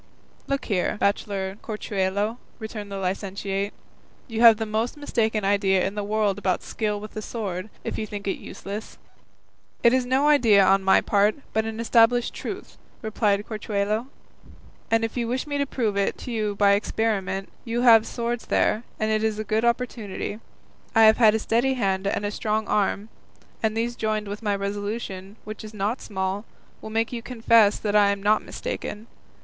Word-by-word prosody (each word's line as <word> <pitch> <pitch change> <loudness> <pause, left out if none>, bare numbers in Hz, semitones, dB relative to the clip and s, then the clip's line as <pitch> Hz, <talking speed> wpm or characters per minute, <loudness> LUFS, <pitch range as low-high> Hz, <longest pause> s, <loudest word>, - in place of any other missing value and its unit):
"Look 275 0 -1
here, 195 -1 0
bachelor 200 -1 -1
Corchuelo," 210 +1 -2 0.2
returned 215 -3 -7
the 200 - -4
licentiate, 195 +1 -2 0.6
"you 225 -2 -3
have 230 -2 +9
the 220 - -2
most 220 +5 -2
mistaken 220 -7 0
idea 195 -2 +2
in 195 - -2
the 205 0 -3
world 205 -1 0
about 185 -3 0
skill 210 -2 -2
with 215 +1 -9
the 215 - -5
sword, 205 -3 -4
if - - -3
you 215 - -3
think 205 -1 -6
it 195 - -1
useless." 205 +3 -7 0.9
"It 235 - +6
is 260 -1 +3
no 265 +3 +3
idea 225 -10 +6
on 195 +1 +4
my 190 0 +4
part, 205 +1 +2 0.2
but 220 0 +1
an 225 0 -5
established 235 +1 +3
truth," - - -7 0.2
replied 210 -2 +1
Corchuelo; 215 +1 -2 0.8
"and 225 0 +3
if 225 - -6
you 235 -1 0
wish 255 +4 -1
me 285 -1 -3
to 280 - 0
prove 225 -6 -1
it 200 0 0
to 250 - -7
you 215 -3 -1
by 200 0 +4
experiment, 200 -2 0
you 235 0 -2
have 230 -3 +7
swords 235 0 -3
there, 215 - +2 0.2
and 215 0 0
it 215 0 +1
is 220 -1 0
a 215 - -2
good 215 +1 0
opportunity; 235 -4 -2 0.6
I 225 - +7
have 220 +2 +6
a 220 -1 +6
steady 240 +4 +1
hand 195 -5 0
and 200 - -1
a 205 - -1
strong 215 0 -1
arm, 210 +1 0 0.5
and 220 0 0
these 235 +1 -1
joined 215 -2 -1
with 205 +2 -5
my 205 -2 0
resolution, 200 -1 -4
which 215 +1 -8
is 215 0 -10
not 210 +5 -1
small, 190 0 -3 0.4
will - - -7
make 225 +2 -1
you 235 - -3
confess 230 -3 +4
that 210 -1 -2
I 205 -1 +6
am 200 -1 -2
not 210 +1 +4
mistaken. 225 - -5
215 Hz, 180 wpm, -25 LUFS, 200-225 Hz, 0.9 s, have